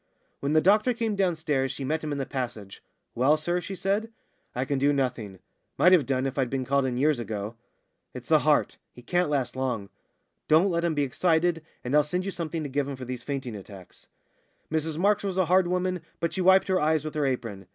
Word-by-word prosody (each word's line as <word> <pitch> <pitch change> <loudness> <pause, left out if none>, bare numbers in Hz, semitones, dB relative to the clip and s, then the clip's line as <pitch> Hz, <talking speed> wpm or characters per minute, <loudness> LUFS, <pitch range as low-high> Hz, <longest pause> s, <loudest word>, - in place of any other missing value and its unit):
When 140 +2 -1
the 155 - +5
doctor 215 +7 +3
came 225 -2 -1
downstairs 155 -8 0
she 140 - -6
met 155 +4 -1
him 155 - -3
in 145 - -2
the 135 - -2
passage. 120 -8 -5 0.3
"Well, 135 +6 +3
sir?" 175 +3 -1
she 195 +2 -6
said. 200 +4 -1 0.4
"I 125 +2 -1
can 140 0 -1
do 140 +2 +3
nothing 125 -8 -2 0.4
might 180 - +5
have 170 -8 +5
done 130 -1 0
if 135 +1 -2
I'd 130 -2 +1
been 130 0 -2
called 140 +1 +2
in 125 -1 -2
years 145 0 +2
ago. 105 -1 -4 0.6
It's - - -8
the - - +6
heart. - - +1
He 125 - -14
can't 180 +3 +1
last 135 -4 -1
long. 125 -7 -2 0.6
Don't 170 +5 +4
let 170 0 0
him 170 -2 0
be 145 - +1
excited, 165 +3 +1 0.2
and 125 - -3
I'll 150 0 +6
send 180 +5 -2
you 195 - -2
something 165 -3 -4
to - - -3
give 140 0 -1
him 140 - -4
for 130 -1 -8
these 125 0 -5
fainting 130 -4 -4
attacks." 95 -2 -12 0.6
Mrs 160 0 -1
Marks 205 +4 +2
was 190 -2 -2
a 185 - +3
hard 180 +2 +3
woman, 180 0 -1 0.2
but 170 - -1
she 190 - -1
wiped 190 +1 +5
her 185 -1 +2
eyes 155 0 +1
with 155 - -4
her 150 -2 0
apron. 115 -7 -4
150 Hz, 225 wpm, -27 LUFS, 130-175 Hz, 0.6 s, the